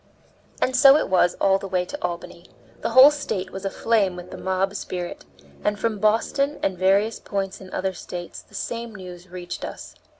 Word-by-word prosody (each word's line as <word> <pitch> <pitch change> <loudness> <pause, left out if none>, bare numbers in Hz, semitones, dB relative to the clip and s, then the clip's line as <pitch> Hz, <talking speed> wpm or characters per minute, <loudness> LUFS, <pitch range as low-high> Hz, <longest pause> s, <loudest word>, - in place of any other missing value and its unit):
And 255 - +1
so 275 +2 +8
it - - -1
was 180 -1 +3
all 195 0 +3
the 195 - -6
way 180 -1 0
to - - -7
Albany. 170 0 -5 0.3
The - - -1
whole 260 +5 +9
State 205 -10 -3
was 190 +1 -7
aflame 200 -1 +1
with 180 0 -9
the - - -7
mob 190 +1 0
spirit, 180 -3 -5 0.4
and 210 0 +1
from 220 -1 -1
Boston 230 +7 +1
and 190 - +1
various 195 +4 +2
points 195 -1 -4
in 185 -1 -11
other 190 0 -2
States 175 -1 -7
the - - -18
same 230 -1 -4
news 180 -1 -10
reached 180 0 -7
us. - - -7
195 Hz, 190 wpm, -24 LUFS, 180-225 Hz, 0.4 s, whole